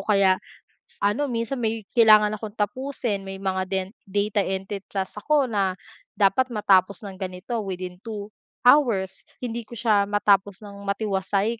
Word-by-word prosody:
kaya, 195 -2 +4 0.7
ano 255 +8 +1
minsan 235 +2 -2
may 220 -2 -2
kailangan 215 -3 +6
akong 215 0 -7
tapusin 215 -1 -2
may 195 0 -7
mga 190 -1 -1
den 190 -1 -1 0.2
data 205 +1 +1
entry 195 +1 -3
task 195 +1 -4
ako 295 0 +3
na 195 -5 0 0.4
dapat 200 +6 +3
matapos 200 -4 +2
ng 195 -1 -8
ganito 190 +5 -4
within 185 -2 -5
2 210 -1 -7 0.3
hours. 230 -9 +4 0.2
Hindi 235 -2 -4
ko 235 - -10
siya 210 -3 +2
matapos 205 -1 +2
ng 200 -1 -10
matiwasay 200 +2 0
205 Hz, 145 wpm, -24 LUFS, 195-225 Hz, 0.7 s, kailangan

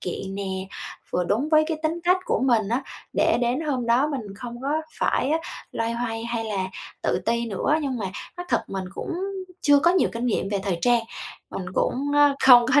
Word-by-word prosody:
kiện 190 +2 -4
nè, 200 0 -3 0.7
vừa 180 - 0
đúng 235 - 0
với 310 0 +5
cái 325 - -1
tính 325 +2 -1
cách 360 +1 +5
của - - 0
mình 230 -6 +3
á, 240 +4 0 0.3
để - - +3
đến 245 +3 +1
hôm 270 -6 -1
đó 245 +5 +4
mình 280 -4 -2 0.2
không 240 +1 -7
có 275 - -2 0.3
phải 270 - +1
á, 320 - +3 0.3
loay 230 0 -1
hoay 230 -1 -3
hay 235 -1 -2
là 200 -4 -1 0.4
tự - - +1
ti 235 +1 +1
nữa. 230 +7 0
Nhưng 265 -4 -2
mà 200 - -2 0.3
nói 355 0 -6
thật - - +1
mình 190 -1 -3
cũng - - -4 0.5
chưa 290 -1 +6
có 340 - +5
nhiều 365 0 +3
kinh 235 +2 -2
nghiệm 210 -4 0
về 200 0 0
thời 190 -4 -1
trang, 240 -1 +4 0.5
mình 185 - -5
cũng, 285 +3 0
ơ, 290 -1 +5
không 245 -2 +9
có 290 - +8
240 Hz, 215 wpm, -24 LUFS, 225-290 Hz, 0.7 s, không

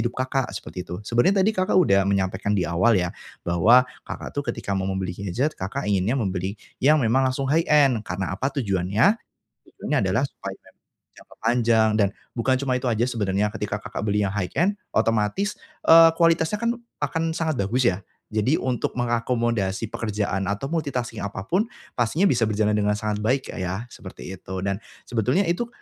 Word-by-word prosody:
hidup 120 +1 -2
Kakak, 130 0 -1
seperti 95 -2 -7
itu. 90 - -4
Sebenernya 185 - +3
tadi 215 - +3
Kakak 185 -3 +1
udah 100 - +4
menyampaikan 100 +1 0
di 90 - +1
awal 95 +7 +3
ya, 90 -1 0 0.3
bahwa 110 +9 +5 0.2
Kakak - - -6
tuh 145 -3 -4
ketika 100 -4 -3
mau 95 0 -1
membeli 95 -2 -2
gadget, 100 - -2
Kakak 100 +9 -4
inginnya 100 +5 +1
membeli 95 -2 -2 0.2
yang 150 +4 +5
memang 130 +3 +3
langsung 130 +1 -2
high-end 150 -7 +4
karena 95 -2 -4
apa 130 +8 -1
tujuannya? 110 - +1 0.4
Tujuannya - - -3
adalah - - +1
supaya - - -7 0.6
jangka - - -18
panjang, 115 -2 +3
dan 100 - +4 0.2
bukan 130 +2 +1
cuma 130 -1 -1
itu 125 0 0
aja 115 0 +1
sebenarnya, 105 -4 0
ketika 105 -2 -3
Kakak 105 - -6
beli 105 0 +1
yang 95 - -1
high-end 170 - 0 0.2
otomatis, 115 - +1 0.2
eee, 165 0 +9
kualitasnya 165 +3 +3
kan 235 +2 -1 0.2
akan 160 +3 -1
sangat 155 -8 -1
bagus 120 +6 +1
ya. 95 -4 +2 0.3
Jadi 110 +8 +2
untuk 125 -2 -2
mengakomodasi 115 -4 -1
pekerjaan 100 -3 -2
atau 120 +10 -3
multitasking 125 -8 -2
apapun, 105 - -1 0.2
pastinya 125 - +1
bisa 120 - +3
berjalan 105 0 +1
dengan 105 0 +1
sangat 105 0 -2
baik 130 +5 +1
Kak - - -6
ya, 95 +5 -3
seperti 95 -1 -9
itu. 95 0 -6
Dan 100 +1 -1 0.2
sebetulnya 125 - +1
itu, 175 +8 -1
115 Hz, 170 wpm, -24 LUFS, 100-135 Hz, 0.6 s, eee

